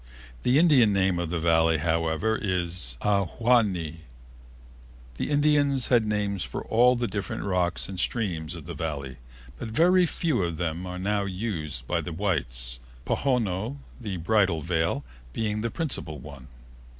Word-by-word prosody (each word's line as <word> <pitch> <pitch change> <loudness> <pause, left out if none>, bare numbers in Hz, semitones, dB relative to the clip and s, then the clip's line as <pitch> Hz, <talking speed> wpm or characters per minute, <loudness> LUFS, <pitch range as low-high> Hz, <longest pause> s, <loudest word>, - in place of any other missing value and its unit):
The 125 +3 +3
Indian 145 -10 +5
name 95 -2 +2
of 85 -2 -2
the 85 - -1
Valley, 80 0 +3
however, 80 +5 0
is 90 - -1
Ahwahnee. 100 -4 +1 1.2
The - - -2
Indians 145 -3 +2
had 115 -4 +4
names 100 -3 -1
for - - -5
all 125 +3 +4
the 120 0 -1
different 100 0 -4
rocks 90 -2 0
and 95 -2 -6
streams 90 -7 -1
of 80 -3 -9
the 85 - -6
Valley, 70 -5 -4 0.4
but - - -4
very 175 +10 +4
few 155 - 0
of 85 -2 -2
them 85 +2 -3
are 90 0 -5
now 100 +2 0
in 95 - -4
use 80 - -3
by - - -1
the 90 - -6
whites, 65 -10 -1 0.3
Pohono, 120 -2 0 0.2
the 105 -6 -4
Bridal 95 -2 +2
Veil, 80 -3 0 0.3
being 105 -1 -1
the 115 - -1
principal 115 - -2
one. 70 -2 -11
95 Hz, 150 wpm, -26 LUFS, 80-115 Hz, 1.2 s, Indian